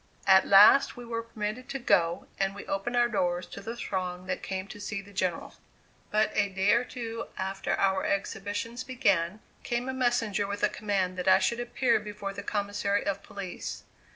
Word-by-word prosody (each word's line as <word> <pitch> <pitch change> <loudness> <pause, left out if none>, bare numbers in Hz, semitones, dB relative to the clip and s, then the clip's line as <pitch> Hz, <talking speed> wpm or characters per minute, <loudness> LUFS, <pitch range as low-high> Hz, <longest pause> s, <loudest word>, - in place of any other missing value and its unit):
At 190 -1 +6
last 205 +8 +7
we 245 - -8
were 230 -1 -3
permitted 230 +2 -5
to 275 - -2
go, 180 -8 +2
and 195 0 0
we 200 - -8
opened 195 +5 -2
our 240 0 +4
doors 180 -5 0
to - - -9
the 225 +3 -5
throng 185 -5 -3
that 185 0 -3
came 190 -1 -4
to 210 - -9
see 205 0 -4
the 200 +1 -12
General. 185 -2 -2 0.6
But 215 +1 +1
a 200 -1 +2
day 190 +1 +2
or 235 +1 +3
two 230 -2 -6
after 195 +1 -2
our 190 -1 +1
exhibitions 205 +4 -2
began, 205 -7 +1 0.2
came 240 0 -2
a 260 - -2
messenger 230 -5 +1
with 200 0 -4
a - - +5
command 190 -3 -1
that 180 - -3
I 190 0 +8
should 235 +4 0
appear 240 0 +1
before 210 -1 -6
the 200 - -6
Commissary 205 0 -1
of 200 0 -1
Police. 195 -3 -6
205 Hz, 190 wpm, -29 LUFS, 190-230 Hz, 0.6 s, I